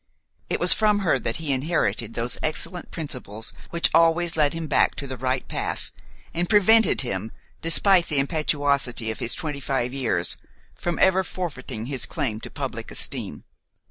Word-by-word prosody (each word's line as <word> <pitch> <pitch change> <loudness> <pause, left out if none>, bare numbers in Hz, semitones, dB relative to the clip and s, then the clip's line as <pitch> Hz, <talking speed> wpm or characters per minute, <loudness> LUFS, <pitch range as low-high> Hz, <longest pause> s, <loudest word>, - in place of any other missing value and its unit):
It - - 0
was - - +7
from 210 -1 +3
her 135 -6 +3
that 115 0 -1
he 155 -4 0
inherited 120 - 0
those 120 +1 -1
excellent 175 +3 -2
principles 125 -8 -7 0.2
which 170 0 +3
always 165 +1 +3
led 150 -2 +3
him 165 0 -4
back 145 - +2
to 140 - -5
the 130 -1 -5
right 130 +1 -2
path - - -4 0.4
and 175 +1 -1
prevented 220 0 +5
him, 110 -4 -3 0.3
despite 175 +2 +4
the 150 - -1
impetuosity 140 -5 +1
of 110 - -7
his 120 - 0
twenty 155 -5 -4
five 130 -2 -1
years, 115 -10 0 0.4
from 175 -1 -3
ever 190 0 +4
forfeiting 140 -12 -5
his 135 0 -3
claim 130 -10 -3
to - - -8
public - - -5
esteem. - - -3
145 Hz, 165 wpm, -24 LUFS, 125-170 Hz, 0.4 s, was